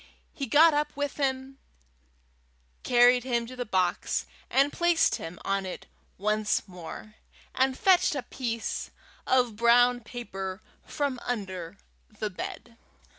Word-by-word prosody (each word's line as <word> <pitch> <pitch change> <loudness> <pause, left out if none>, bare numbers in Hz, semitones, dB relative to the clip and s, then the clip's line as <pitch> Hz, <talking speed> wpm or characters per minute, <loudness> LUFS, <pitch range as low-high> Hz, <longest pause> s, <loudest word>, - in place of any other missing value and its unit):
He 275 - -4
got 310 +6 +6
up 295 0 -1
with 285 -1 -2
him, 270 -1 -2 1.2
carried 245 0 +5
him 240 -2 0
to 255 +2 -9
the 245 -2 -4
box, 185 -3 0 0.5
placed 345 -1 +2
him 165 +2 -8
on 195 0 0
it 185 -1 -7 0.3
once 210 +2 0
more, 180 +4 -9 0.4
and 260 0 +1
fetched 365 -5 +4
a 275 - -3
piece 235 -3 -4 0.4
of 250 -4 +2
brown 245 +2 +5
paper 195 -5 -6 0.3
from 280 -4 -2
under 190 -6 -4 0.4
the 215 -1 -3
bed. 230 +5 -7
240 Hz, 125 wpm, -28 LUFS, 205-265 Hz, 1.2 s, got